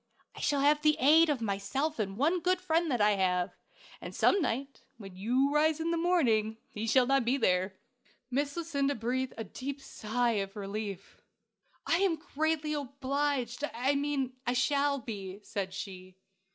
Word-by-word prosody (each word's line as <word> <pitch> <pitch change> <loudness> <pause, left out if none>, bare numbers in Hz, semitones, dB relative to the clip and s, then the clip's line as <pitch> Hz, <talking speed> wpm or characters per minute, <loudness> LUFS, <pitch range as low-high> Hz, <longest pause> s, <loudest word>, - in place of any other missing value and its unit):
I - - -9
shall 285 -2 +1
have 295 +1 +4
the 305 0 +3
aid 315 +5 +6
of 280 -5 0
myself 225 +9 -2
and 195 -2 -2
one 320 +8 +2
good 365 +1 +1
friend 335 -2 +1
that 245 -5 0
I 210 0 +5
have; 180 -2 0 0.5
and - - -7
some 400 - +4
night, 275 0 -3 0.2
when 195 -4 -10
you 250 +9 +1
rise 310 +1 +3
of 330 +1 -1
the - - +1
morning, 245 -11 +2
he 215 +2 -4
shall 250 +3 +4
not 270 0 +3
be 245 +4 +1
there." 185 -4 +1 0.6
Miss 285 +4 -1
Lucinda 285 -4 0
breathed 250 +3 -2
a 225 - -3
deep 275 +7 -6
sigh 235 -3 -1
of 195 +1 -6
relief. 200 -1 -6 0.6
"I 335 - +3
am 380 -2 +2
greatly 315 0 -1
obliged 280 -2 -2
I 260 +4 +1
mean, 280 -2 -1
I 245 - +2
shall 280 +3 +2
be," 200 -6 -6
said 195 -3 -4
she. 185 -1 -8
265 Hz, 170 wpm, -30 LUFS, 215-295 Hz, 0.6 s, aid